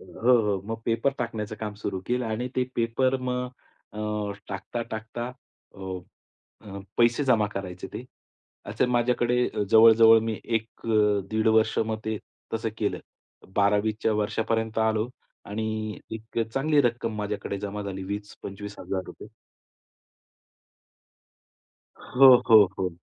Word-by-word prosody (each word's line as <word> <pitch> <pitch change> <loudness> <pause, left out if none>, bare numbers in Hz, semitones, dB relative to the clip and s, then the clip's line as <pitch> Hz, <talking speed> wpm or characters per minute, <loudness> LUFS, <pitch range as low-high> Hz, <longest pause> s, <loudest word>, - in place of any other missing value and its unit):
हो, 115 +7 0
हो. 100 -3 0
मग 115 0 -4
पेपर 115 +4 +1
टाकण्याचं 110 -3 -3
काम 105 -1 -4
सुरू 100 -2 -4
केलं 125 0 0
आणि 115 +3 -2
ते 130 - +2
पेपर 130 +3 +1
मग 125 0 -2 0.5
अ, 105 -1 -2 0.2
टाकता, 100 +4 -4
टाकता 110 +2 -5 0.5
अ, 100 - -13 0.8
अ, 100 -2 -9 0.2
पैसे 120 +4 +3
जमा 115 -5 +3
करायचे 95 -2 -5
ते. - - -6 0.6
असे - - 0
माझ्याकडे 125 0 +2
अ, - - -2
जवळ-जवळ 115 0 +8
मी 110 - -3
एक 115 -1 -1 0.2
अ, 105 -2 +3
1.5 110 0 +1
वर्ष 110 0 +3
मग 110 0 0
ते 110 -1 -2 0.4
तसं 110 0 -1
केलं. 105 - -1 0.6
12वी 105 +2 +3
च्या 110 - +2
वर्षापर्यंत 110 +1 -1
आलो 110 0 +1 0.4
आणि 110 0 -3
एक 110 +1 -6 0.2
चांगली 145 +2 +3
रक्कम 115 -2 -1
माझ्याकडे 105 -1 -3
जमा 105 0 -4
झाली, 95 -1 -5
₹20,000-₹25,000. 100 -1 -6 2.7
हो, 130 0 +7 0.2
हो, 110 -2 +9
हो. 95 -1 0
110 Hz, 130 wpm, -26 LUFS, 105-115 Hz, 2.7 s, हो